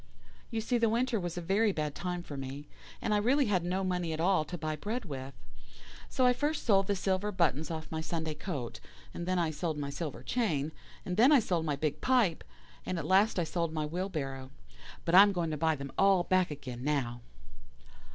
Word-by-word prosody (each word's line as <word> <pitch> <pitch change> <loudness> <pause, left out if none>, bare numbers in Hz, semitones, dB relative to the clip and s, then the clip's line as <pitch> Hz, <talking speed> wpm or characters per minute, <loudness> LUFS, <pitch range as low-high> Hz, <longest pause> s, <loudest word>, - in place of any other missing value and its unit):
You 225 - -2
see 240 +2 0
the 230 -1 +3
winter 235 0 +1
was 175 -1 -4
a - - -2
very 200 +5 +2
bad 150 -5 -2
time 180 +1 -4
for 145 - -8
me, 135 +2 -6 0.4
and 215 - +1
I - - +4
really 260 +7 +3
had 190 -6 +1
no 185 +2 -1
money 180 -3 -1
at 155 - -4
all 180 -1 +3
to 175 +4 -6
buy 155 -1 -2
bread 215 +9 -4
with. 135 -4 -6 0.7
So 255 - +2
I 250 - +6
first 295 +4 -1
sold 195 -4 +4
the 200 - +1
silver 190 +2 0
buttons 160 -5 +1
off 160 -1 -4
my 160 0 -2
Sunday 160 0 -3
coat, 150 -6 -5 0.3
and 175 - -5
then 185 0 +1
I 165 -2 +1
sold 155 0 -3
my 140 -1 -3
silver 150 -1 -5
chain, 160 - 0 0.3
and 180 - -3
then 250 +6 +7
I 290 - +8
sold 175 -7 0
my 150 -2 0
big 150 +1 -2
pipe, 240 -10 +2 0.4
and 185 - -3
at 160 - -3
last 195 +6 +4
I 175 - +2
sold 165 0 -2
my 155 -1 -1
wheelbarrow. 150 -6 -4 0.6
But 165 - 0
I 190 - +11
am 200 0 +5
going 170 -3 -1
to - - -1
buy 160 +1 +2
them 140 -1 -7
all 195 -2 +5
back 185 0 +2
again 130 -5 -7
now. 130 -5 -1
175 Hz, 220 wpm, -31 LUFS, 150-195 Hz, 0.7 s, I